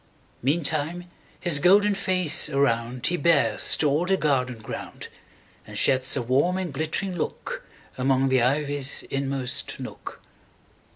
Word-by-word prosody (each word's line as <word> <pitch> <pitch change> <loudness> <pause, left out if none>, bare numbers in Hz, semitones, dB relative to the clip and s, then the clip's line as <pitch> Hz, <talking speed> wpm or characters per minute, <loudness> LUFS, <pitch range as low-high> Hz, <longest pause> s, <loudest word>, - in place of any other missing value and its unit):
Meantime 155 +4 -1 0.3
his 170 -6 +3
golden 200 +6 +4
face 185 -6 +3
aroundHe 130 +2 -1
bears 140 -10 +3
to 155 - +1
all 150 +5 0
the 190 0 +2
garden 130 -6 0
ground, 110 0 -8 0.6
And - - -8
sheds 130 +1 +2
a 125 - -2
warm 140 +10 +1
and 180 -6 -4
glittering 160 +6 -3
lookAmong 135 -2 -3
the 130 -2 +2
ivy's 140 +1 -1
inmost 135 -2 -2
nook. - - -9
140 Hz, 120 wpm, -24 LUFS, 130-175 Hz, 0.6 s, golden